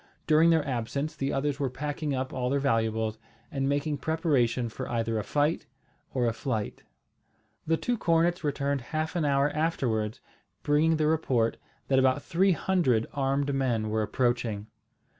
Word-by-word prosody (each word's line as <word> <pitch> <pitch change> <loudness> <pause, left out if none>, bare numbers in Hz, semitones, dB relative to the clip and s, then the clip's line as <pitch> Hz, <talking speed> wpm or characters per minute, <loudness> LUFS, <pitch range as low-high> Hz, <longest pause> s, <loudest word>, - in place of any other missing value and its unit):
During 160 +2 +5
their 160 -3 +3
absence 140 +5 -2
the 140 -1 -2
others 140 0 -1
were 140 -2 0
packing 145 +2 -3
up 130 0 -3
all 125 -1 -1
their 140 - +1
valuables, 110 -4 0 0.3
and 135 -3 -1
making 145 +1 -1
preparation 135 -6 +1
for 110 - -6
either 115 -1 -1
a - - -3
fight 150 +8 0 0.4
or 125 -2 0
a 115 - +1
flight. 110 -3 -3 0.9
The 165 +1 +3
two 240 +3 -1
cornets 170 +1 +2
returned 140 -1 -1
half 155 +6 -3
an 165 -3 +1
hour 140 0 +2
afterwards, 120 -9 -1 0.4
bringing 155 +2 +3
the 155 - +1
report, 135 -7 +1 0.3
that 135 -1 +3
about 130 +2 +2
three 190 +2 +3
hundred 155 -12 +1
armed 140 0 0
men 120 -5 0
were 110 0 +1
approaching. 120 -2 0
140 Hz, 160 wpm, -28 LUFS, 120-155 Hz, 0.9 s, During